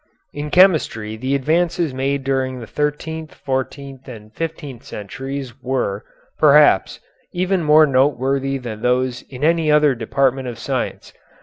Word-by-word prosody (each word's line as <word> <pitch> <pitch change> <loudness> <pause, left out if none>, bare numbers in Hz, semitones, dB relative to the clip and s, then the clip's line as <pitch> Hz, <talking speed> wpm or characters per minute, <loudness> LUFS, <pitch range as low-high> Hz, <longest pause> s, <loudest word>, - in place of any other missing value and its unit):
In 145 +1 -5
chemistry 150 - +3
the 130 +5 -1
advances 165 +2 0
made 135 +1 -1
during 130 -1 -1
the 115 - -8
thirteenth, 155 +4 -4
fourteenth, 135 0 -5
and 110 -4 -11
fifteenth 150 -5 -6
centuries 135 +5 -6
were, 120 -6 -2 0.4
perhaps, 150 -8 +5 0.3
even 185 +1 0
more 155 0 +6
noteworthy 135 0 +1
than 115 -4 -7
those 125 0 0
in 130 +1 -8
any 160 -1 +2
other 150 -2 +4
department 130 +2 0
of 120 -2 -6
science. 130 +2 -4
135 Hz, 130 wpm, -20 LUFS, 125-150 Hz, 0.4 s, more